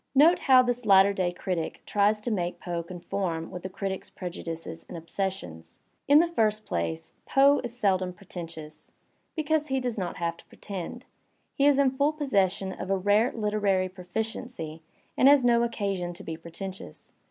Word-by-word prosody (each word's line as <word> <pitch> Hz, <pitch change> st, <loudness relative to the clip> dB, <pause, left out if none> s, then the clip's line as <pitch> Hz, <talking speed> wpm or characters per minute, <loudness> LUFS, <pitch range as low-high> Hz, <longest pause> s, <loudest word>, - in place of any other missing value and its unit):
Note 320 Hz, +6 st, +6 dB
how 260 Hz, -1 st, +6 dB
this 245 Hz, 0 st, -1 dB
latter 200 Hz, -1 st, +6 dB
day 185 Hz, -2 st, 0 dB
critic 175 Hz, -2 st, -3 dB
tries 210 Hz, +1 st, +2 dB
to 230 Hz, +3 st, -3 dB
make 175 Hz, -4 st, -2 dB
Poe 175 Hz, -1 st, -3 dB
conform 170 Hz, -1 st, -4 dB
with 180 Hz, -, -6 dB
the 185 Hz, -, -5 dB
critic's 190 Hz, 0 st, -4 dB
prejudices 165 Hz, -2 st, -6 dB
and 175 Hz, -, -6 dB
obsessions. 165 Hz, -, -5 dB, 0.3 s
In 285 Hz, +1 st, +7 dB
the 340 Hz, -, +4 dB
first 215 Hz, -9 st, +1 dB
place, 80 Hz, -1 st, -3 dB
Poe 280 Hz, +1 st, +5 dB
is 240 Hz, 0 st, -6 dB
seldom 185 Hz, -4 st, +1 dB
pretentious, 165 Hz, -4 st, -9 dB, 0.4 s
because 310 Hz, -1 st, 0 dB
he 265 Hz, -1 st, 0 dB
does 245 Hz, -4 st, -3 dB
not 180 Hz, -2 st, -3 dB
have 170 Hz, -1 st, -2 dB
to -, -, -17 dB
pre -, -, -19 dB
tend; 200 Hz, +5 st, -6 dB, 0.5 s
he 280 Hz, -, +3 dB
is 285 Hz, -2 st, +5 dB
in 275 Hz, -2 st, +4 dB
full 285 Hz, +3 st, +1 dB
possession 195 Hz, -10 st, 0 dB
of 185 Hz, -, -6 dB
a 195 Hz, -, +2 dB
rare 205 Hz, +6 st, +3 dB
literary 205 Hz, -4 st, +1 dB
proficiency 185 Hz, -2 st, -5 dB, 0.3 s
and 260 Hz, -, +5 dB
has 280 Hz, -3 st, +6 dB
no 235 Hz, -1 st, +5 dB
occasion 200 Hz, -6 st, -2 dB
to -, -, -10 dB
be 165 Hz, -, -5 dB
pretentious. 170 Hz, -, -8 dB
195 Hz, 175 wpm, -27 LUFS, 175-245 Hz, 0.5 s, In